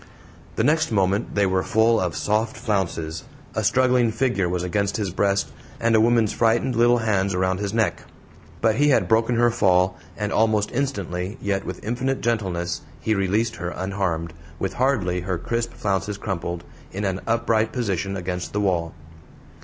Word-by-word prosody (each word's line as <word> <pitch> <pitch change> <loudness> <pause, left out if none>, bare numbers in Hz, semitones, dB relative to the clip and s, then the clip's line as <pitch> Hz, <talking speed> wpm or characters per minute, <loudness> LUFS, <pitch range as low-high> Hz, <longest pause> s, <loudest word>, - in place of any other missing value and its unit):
The - - +1
next 155 -1 +2
moment 100 0 +1
they 100 -1 +3
were 95 0 +1
full 110 +2 +3
of 90 -3 -1
soft 110 +2 0
flounces, 90 -8 -2 0.3
a - - -1
struggling 125 -2 +3
figure 115 -6 0
was 90 0 -1
against 100 +2 0
his 100 -4 -2
breast, 100 +2 +1 0.3
and 115 0 +2
a 110 - +5
woman's 115 -2 +3
frightened 115 +2 +2
little 120 +1 +4
hands 100 -4 0
around 95 +1 0
his 100 -1 -2
neck. 110 0 0 0.6
But 110 -1 +2
he 145 +2 +4
had 115 -10 +3
broken 115 +4 +2
her 120 0 +4
fall, 90 -3 +3 0.2
and 105 -1 -2
almost 110 -2 +2
instantly, 100 -7 -3
yet 100 -1 -1
with 90 +1 -6
infinite 130 +4 -1
gentleness, 95 -7 -1 0.2
he 110 - 0
released 105 +3 0
her 85 0 -3
unharmed, 90 -3 -2 0.2
with 95 +4 -2
hardly 110 -9 +1
her 90 0 -2
crisp 115 +6 -2
flounces 100 0 -1
crumpled, 85 -4 -4 0.3
in 100 +2 -3
an 95 0 -1
upright 115 -1 +1
position 100 -5 -2
against 90 -1 -4
the 105 - 0
wall. 85 -4 0
100 Hz, 170 wpm, -23 LUFS, 95-115 Hz, 0.6 s, a